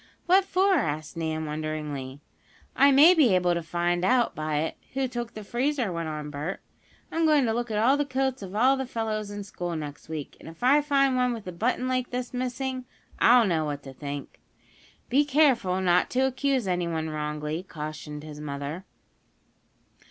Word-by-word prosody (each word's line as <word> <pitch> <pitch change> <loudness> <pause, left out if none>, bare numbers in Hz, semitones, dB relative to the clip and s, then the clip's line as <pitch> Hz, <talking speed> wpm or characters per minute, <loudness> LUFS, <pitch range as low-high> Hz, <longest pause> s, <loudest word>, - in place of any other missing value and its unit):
"What 375 +2 +5
for?" 385 +1 +2
asked 155 - -3
Nan, 160 -1 -2
wonderingly. 150 -3 -5 0.5
"I 280 0 +6
may 295 +6 +8
be 275 - +4
able 180 -1 +2
to 170 - -1
find 175 +1 -1
out 245 +4 +3
by 155 -1 -1
it, 160 - -3 0.2
who 270 -1 +1
took 240 -1 -5
the 215 - -7
freezer," 250 0 -1
went 165 -2 -3
on 150 -1 -5
Bert. 150 +6 -4 0.5
"I'm 330 - 0
going 300 -4 +4
to 225 - +1
look 240 +1 -2
at 225 +5 +3
the 290 - +2
coats 265 -1 -1
of 195 0 -7
all 255 +5 +4
the 265 -1 -3
fellows 215 -3 -3
in 205 0 -6
school 175 -3 -5
next 150 -1 -7
week, 155 -3 -6
and - - -10
if 165 +7 -12
I 280 +4 +5
find 275 -2 +2
one 250 -1 +2
with 225 -3 -7
the 180 - -5
button 245 +8 -1
like 255 -1 -1
this 250 0 -4
missing, 255 +1 -3 0.3
I'll 240 0 +6
know 165 -5 +1
what 145 -1 -4
to 135 - -9
think." 140 0 -7 0.7
"Be 275 +4 +3
careful 265 -11 +3
not 180 -1 +3
to 255 - 0
accuse 265 -3 0
anyone 170 -3 -1
wrongly," 150 +1 -3
cautioned 150 -3 -7
his 150 -1 -9
mother. 145 +4 -5
195 Hz, 185 wpm, -27 LUFS, 155-255 Hz, 0.7 s, may